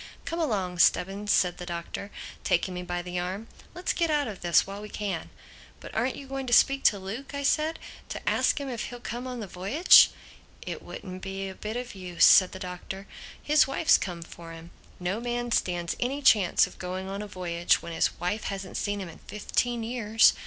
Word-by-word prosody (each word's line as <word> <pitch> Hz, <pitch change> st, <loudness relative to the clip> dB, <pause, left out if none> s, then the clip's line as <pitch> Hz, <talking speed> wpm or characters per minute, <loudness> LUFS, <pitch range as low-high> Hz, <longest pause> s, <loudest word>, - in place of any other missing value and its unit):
"Come 335 Hz, -, -3 dB
along, 195 Hz, -, -1 dB
Stubbins," 195 Hz, +4 st, +2 dB
said 180 Hz, -1 st, +2 dB
the 180 Hz, -, -5 dB
Doctor, 170 Hz, +3 st, -5 dB, 0.3 s
taking 180 Hz, +2 st, +1 dB
me 180 Hz, -, -4 dB
by 175 Hz, 0 st, -3 dB
the 180 Hz, 0 st, -3 dB
arm, 185 Hz, +5 st, -4 dB, 0.3 s
"let's 360 Hz, +1 st, -1 dB
get 335 Hz, -2 st, +1 dB
out 295 Hz, -3 st, +1 dB
of 205 Hz, -4 st, -7 dB
this 170 Hz, -2 st, +4 dB
while 200 Hz, +1 st, -7 dB
we 210 Hz, -, -8 dB
can." 195 Hz, -7 st, -4 dB, 0.5 s
"But -, -, -10 dB
aren't 245 Hz, +4 st, 0 dB
you 280 Hz, -, -9 dB
going 270 Hz, 0 st, -5 dB
to 240 Hz, -, 0 dB
speak 275 Hz, +3 st, +5 dB
to 205 Hz, -, +5 dB
Luke?" 220 Hz, +9 st, -7 dB
I 280 Hz, -, -3 dB
said—"to 310 Hz, +3 st, -2 dB
ask -, -, +2 dB
him 280 Hz, -, -4 dB
if 240 Hz, -4 st, -3 dB
he'll 245 Hz, -1 st, -8 dB
come 240 Hz, +2 st, -5 dB
on 250 Hz, -2 st, -5 dB
the -, -, -4 dB
voyage?" 195 Hz, -, +6 dB, 0.5 s
"It -, -, -5 dB
wouldn't 185 Hz, -2 st, -8 dB
be 195 Hz, 0 st, -4 dB
a 190 Hz, -, -6 dB
bit 215 Hz, +4 st, -5 dB
of 250 Hz, 0 st, -5 dB
use," 180 Hz, -3 st, +2 dB
said 185 Hz, -2 st, +7 dB
the -, -, -7 dB
Doctor. 190 Hz, +1 st, -7 dB, 0.4 s
"His 300 Hz, -1 st, +4 dB
wife's 310 Hz, +4 st, +4 dB
come 175 Hz, -3 st, -5 dB
for 165 Hz, 0 st, -11 dB
him. 165 Hz, +1 st, -11 dB, 0.3 s
No 180 Hz, +4 st, -2 dB
man 240 Hz, 0 st, -3 dB
stands 175 Hz, -5 st, 0 dB
any 275 Hz, +4 st, -2 dB
chance 210 Hz, -8 st, +5 dB
of -, -, -13 dB
going 185 Hz, +1 st, -4 dB
on 195 Hz, +1 st, -4 dB
a 210 Hz, -, -6 dB
voyage 175 Hz, -3 st, 0 dB
when 170 Hz, -, -6 dB
his 165 Hz, -, 0 dB
wife 195 Hz, +5 st, -2 dB
hasn't 195 Hz, -2 st, -4 dB
seen 205 Hz, -1 st, -2 dB
him 190 Hz, -, -5 dB
in 165 Hz, -, -12 dB
fifteen 235 Hz, +3 st, -1 dB
years. 225 Hz, -2 st, +4 dB
200 Hz, 210 wpm, -27 LUFS, 180-245 Hz, 0.5 s, said